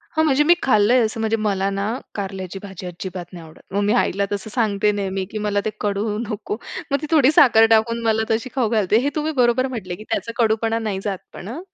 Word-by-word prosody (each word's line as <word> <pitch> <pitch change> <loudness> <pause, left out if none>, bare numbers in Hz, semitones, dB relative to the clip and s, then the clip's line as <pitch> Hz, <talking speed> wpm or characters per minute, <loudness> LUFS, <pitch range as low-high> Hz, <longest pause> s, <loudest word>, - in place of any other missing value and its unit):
हां, 315 - +3
म्हणजे 295 -1 +3
मी 340 +3 +6
खाल्लंय, 240 0 +4
असं 220 +1 -4
म्हणजे 225 0 +1
मला 200 -2 0
ना 200 0 -2 0.3
कारल्याची 195 -2 -5
भाजी 190 -2 -8
अजिबात 180 0 -6
नाही 170 -2 -9
आवडत. 155 - -16
मग 200 - +1
मी 205 +1 +2
आईला 200 +2 -1
तसं 205 +1 -4
सांगते 210 -3 +1
नेहमी, 195 -2 -2
की 215 - -4
मला 205 -1 +1
ते - - +1
कडू 210 +1 -1
नको. 210 -1 -4 0.3
मग 280 - +3
ती 305 - -4
थोडी 295 -3 +5
साखर 235 -7 +6
टाकून 230 +1 0
मला 220 0 +2
तशी 225 +3 0
खाऊ 250 -5 +1
घालते. 215 -2 +2
हे 285 - +2
तुम्ही 310 +1 -1
बरोबर 245 +2 +3
म्हटलं, 195 -9 -5
की 215 - -11
त्याचा 230 - -2
कडूपणा 225 +1 +1
नाही 210 -4 -3
जात, 195 -2 -2 0.2
पण 180 - -9
हां. 255 +10 -6
215 Hz, 225 wpm, -21 LUFS, 195-235 Hz, 0.3 s, मी